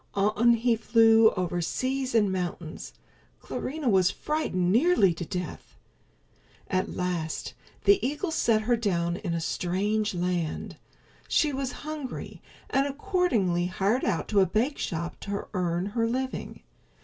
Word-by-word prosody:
On 215 +4 +3
he 235 +1 +2
flew 225 0 +5
over 175 -2 -1
seas 260 +7 -2
and 205 -4 +4
mountains. 175 -3 -4 0.5
Clarinha 295 0 -4
was 190 -4 +4
frightened 190 - -1
nearly 235 - +4
to 170 - -5
death. 180 -1 -6 0.9
At 185 0 -1
last 175 -3 -3 0.3
the 405 -1 +4
eagle 295 +7 -1
set 225 -8 +2
her 240 +2 +2
down 175 -6 0
in 170 -4 -3
a - - -1
strange 200 +5 -1
land. 175 -2 -2 0.5
She 300 -2 +2
was 265 -1 -2
hungry, 305 -4 -6 0.3
and, 275 +1 +2
accordingly, 270 - 0
hired 195 +7 0
out 205 +1 -1
in 205 - +5
a 190 - +5
bakeshop 210 - -2
to 200 0 -4
earn 175 -1 0
her 230 +3 0
living. 260 +2 -4
210 Hz, 135 wpm, -27 LUFS, 180-255 Hz, 0.9 s, flew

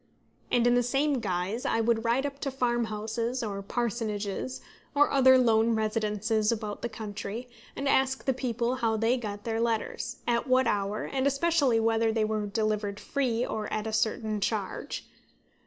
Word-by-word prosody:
And 240 -1 +3
in 245 - +5
the 245 - +4
same 275 +3 +1
guise 195 +2 -2
I 225 - +1
would 225 0 +2
ride 240 +4 +2
up 280 -1 -4
to 280 - -2
farmhouses, 235 -1 -1
or 200 -2 -3
parsonages, 220 +1 -2 0.4
or 290 +1 +4
other 260 -1 +6
lone 230 -2 +3
residences 215 0 0
about 215 -2 -3
the 235 - -2
country, 220 +2 -6 0.3
and 275 - -3
ask 265 -1 +2
the 265 - +2
people 245 -1 -1
how 225 -3 +1
they 225 +3 +2
got 205 -4 -5
their 225 0 -1
letters, 235 +1 -2
at 235 +2 +1
what 255 0 +4
hour, 205 +1 0
and 270 0 0
especially 280 -4 +2
whether 225 0 +2
they 220 -1 +1
were 215 -1 -1
delivered 210 -1 -1
free 250 -4 0
or 215 -1 -4
at 215 0 -2
a 220 - -3
certain 220 -1 0
charge. 205 -2 -3
230 Hz, 170 wpm, -28 LUFS, 215-255 Hz, 0.4 s, other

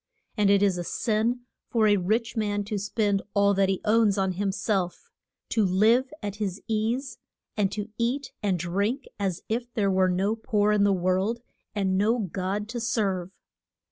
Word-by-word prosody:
And 210 -2 +3
it 200 0 +4
is 190 -3 +2
a - - -2
sin 225 +6 0 0.3
for 225 -2 +3
a 205 - +5
rich 220 +6 0
man 205 -2 0
to 205 0 -3
spend 205 0 0
all 200 0 +4
that 195 -1 +2
he 190 - -1
owns 215 -2 +3
on 190 -1 +1
him 195 +2 -1
self, 195 - -2 0.4
to 220 - +2
live 220 +7 +3
at 205 0 -4
his 200 -3 -3
ease, 230 +4 -1 0.4
and 200 -2 +1
to 210 0 -4
eat 255 +4 -1
and 195 -3 +1
drink, 200 - -1
as 190 -4 -2
if 240 +2 -2
there 200 -3 +2
were 185 0 +3
no 195 +4 +1
poor 210 -2 +1
in 205 -1 +3
the 200 - +4
world, 190 +5 0 0.3
and 190 -2 +1
no 220 +4 +3
God 195 0 -2
to 240 0 -4
serve. 200 -6 -1
205 Hz, 180 wpm, -26 LUFS, 195-225 Hz, 0.4 s, a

